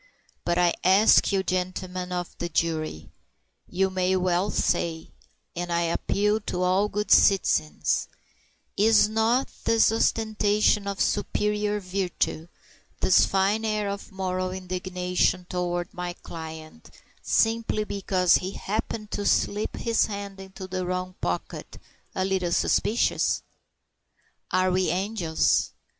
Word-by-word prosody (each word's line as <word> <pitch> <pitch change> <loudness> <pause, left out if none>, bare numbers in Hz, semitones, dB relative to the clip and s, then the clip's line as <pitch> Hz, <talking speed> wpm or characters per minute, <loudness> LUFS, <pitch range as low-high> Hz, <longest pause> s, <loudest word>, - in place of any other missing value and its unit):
But 175 0 0
I 175 -1 +3
ask 195 +4 +5
you, 195 -1 +1
gentlemen 185 0 -3
of 180 -1 -4
the 175 - -3
jury 155 - -2 0.6
you 190 +1 0
may 185 0 +1
well 185 +1 +1
say 160 -4 -1 0.4
and 175 0 -4
I 170 0 +1
appeal 205 +5 0
to 180 -3 -3
all 190 +3 +2
good 210 0 -3
citizens, 80 - +3 0.7
is 215 +1 +5
not 225 +4 +1
this 225 -1 +4
ostentation 215 -2 +1
of 200 -1 -4
superior 210 0 0
virtue, 185 -4 -2 0.5
this 185 - +4
fine 195 +3 +1
air 215 -2 -1
of 200 +2 -7
moral 185 -1 -2
indignation 180 -1 -1
toward 175 -1 -3
my 180 0 -4
client 160 +4 -10 0.3
simply 225 -1 +1
because 190 -3 +2
he 185 +2 -5
happened 215 +1 -4
to 205 - -2
slip 205 +1 0
his 230 -1 +1
hand 200 -1 -6
into 190 0 -9
the 185 0 -3
wrong 185 0 -3
pocket, 90 0 -4 0.4
a 185 - 0
little 190 -2 -1
suspicious? 225 +6 +1 1.1
Are 185 0 +2
we 185 -1 +1
angels? 180 -2 0
185 Hz, 120 wpm, -26 LUFS, 180-210 Hz, 1.1 s, ask